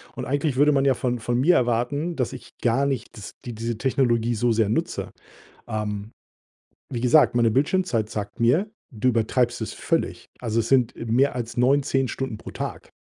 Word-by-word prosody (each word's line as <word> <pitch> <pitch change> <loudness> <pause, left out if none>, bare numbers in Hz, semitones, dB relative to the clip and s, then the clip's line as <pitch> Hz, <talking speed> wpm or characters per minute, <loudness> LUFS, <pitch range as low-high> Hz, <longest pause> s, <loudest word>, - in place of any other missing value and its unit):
Und - - -5
eigentlich 145 0 0
würde 145 +3 +5
man 135 0 +2
ja 135 -2 +4
von 125 0 -1
von 120 +2 -1
mir 165 +7 +5
erwarten, 125 +8 0
dass 125 -5 -2
ich 120 0 -12
gar 120 +4 +2
nicht 130 -4 -3
das 105 - -9
dies 120 - -5
diese 115 +1 -3
Technologie 120 -2 +1
so 120 +2 +1
sehr 110 -2 +2
nutze. 110 - -2 0.6
Ähm, 105 0 -4 0.8
wie 120 - -2
gesagt, 135 +4 +5
meine 120 -1 +3
Bildschirmzeit 135 - +1
sagt 105 +2 -5
mir: 150 - +3 0.2
„Du 115 +2 0
übertreibst 120 +1 +1
es 110 - -4
völlig.“ - - -2
Also, 115 -1 0
es 115 - -3
sind, 125 -3 +3
äh, - - -6
mehr 125 +5 +2
als 120 -1 -5
9, 135 +4 +3
10 135 -1 0
Stunden 130 -4 -4
pro - - -9
Tag. - - -6
120 Hz, 195 wpm, -24 LUFS, 115-135 Hz, 0.8 s, würde